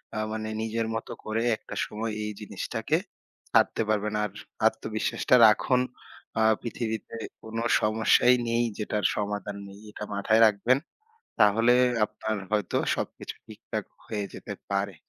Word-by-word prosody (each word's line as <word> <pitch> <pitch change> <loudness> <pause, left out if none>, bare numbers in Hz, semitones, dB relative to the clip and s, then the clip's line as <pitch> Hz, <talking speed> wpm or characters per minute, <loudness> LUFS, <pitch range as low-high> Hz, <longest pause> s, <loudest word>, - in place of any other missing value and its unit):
আ - - -2
মানে, 110 0 -3
নিজের 110 0 -1
মত 115 - -4 0.2
করে 110 +1 -1 0.2
একটা - - -10
সময় 110 +1 -4
এই 105 - -3
জিনিসটাকে - - -2 0.5
ছাড়তে - - +3
পারবেন। 105 0 0
আর 105 - -1 0.4
আত্মবিশ্বাসটা 110 +2 +1
রাখুন। 125 +4 +3 0.6
আ - - +3 0.2
পৃথিবীতে 110 -2 -4 0.3
কোনো 115 +1 -4 0.2
সমস্যাই 110 +3 +4
নেই, 115 +1 +2
যেটার 105 -2 -2
সমাধান 105 0 -3
নেই। 100 0 -12
এটা 105 - -7
মাথায় 110 +3 +3
রাখবেন। 110 +5 +3 0.6
তাহলে 115 +4 +5 0.3
আপনার 110 +1 -4 0.2
হয়তো 105 -4 +1 0.2
সবকিছু - - -5
ঠিকঠাক 110 -1 -6 0.2
হয়ে 105 -2 -3
যেতে - - -7 0.2
পারে। 100 -2 -1
110 Hz, 130 wpm, -27 LUFS, 105-115 Hz, 0.6 s, তাহলে